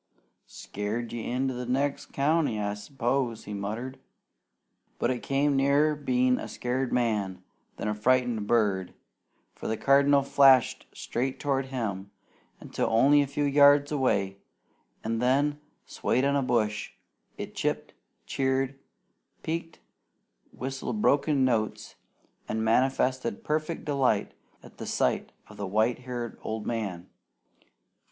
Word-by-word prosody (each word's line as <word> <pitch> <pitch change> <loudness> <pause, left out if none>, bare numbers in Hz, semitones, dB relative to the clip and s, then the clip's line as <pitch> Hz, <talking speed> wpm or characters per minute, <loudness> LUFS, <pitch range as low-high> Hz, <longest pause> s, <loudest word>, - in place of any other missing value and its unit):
"Scared 110 +4 -5
you 120 - -3
into 130 +3 -1
the 125 0 -5
next 135 +3 -1
county, 145 -5 +1
I 100 -1 -1
s'pose," 120 +2 -2
he 105 - -7
muttered. 110 +6 -5 1.0
But - - +1
it 125 - -3
came 140 +1 +1
nearer 140 +3 +3
being 125 -3 +1
a - - -5
scared 125 +1 -2
man 105 -6 0 0.3
than - - -3
a 105 - 0
frightened 120 -1 +1
bird, 100 -6 +1 0.6
for - - -7
the 110 - -1
Cardinal 140 +2 +4
flashed 135 -2 +4
straight 130 +2 -3
toward 135 -2 0
him 100 -7 -4 0.5
until - - -2
only 135 +6 +5
a 140 - 0
few 140 +2 -2
yards 145 0 +5
away, 100 -9 0 0.7
and 115 +1 -1
then, 140 +4 +2 0.3
swaying 130 +2 0
on 140 0 +2
a 140 - +2
bush, 110 -5 0 0.4
it - - -6
chipped, - - -2 0.3
cheered, 135 0 -1 0.6
peeked, 165 +1 -4 0.7
whistled 135 +10 -4
broken 140 -5 +3
notes, 110 -4 -1 0.6
and 110 0 -1
manifested 130 - +1
perfect 155 0 -2
delight 135 -8 +1 0.3
at - - -15
the - - -6
sight - - 0 0.2
of - - -14
the 100 - -4
white 110 +5 +1
haired 125 -2 -6
old 110 -1 -4
man. 100 -7 -3
130 Hz, 130 wpm, -28 LUFS, 110-140 Hz, 1.0 s, only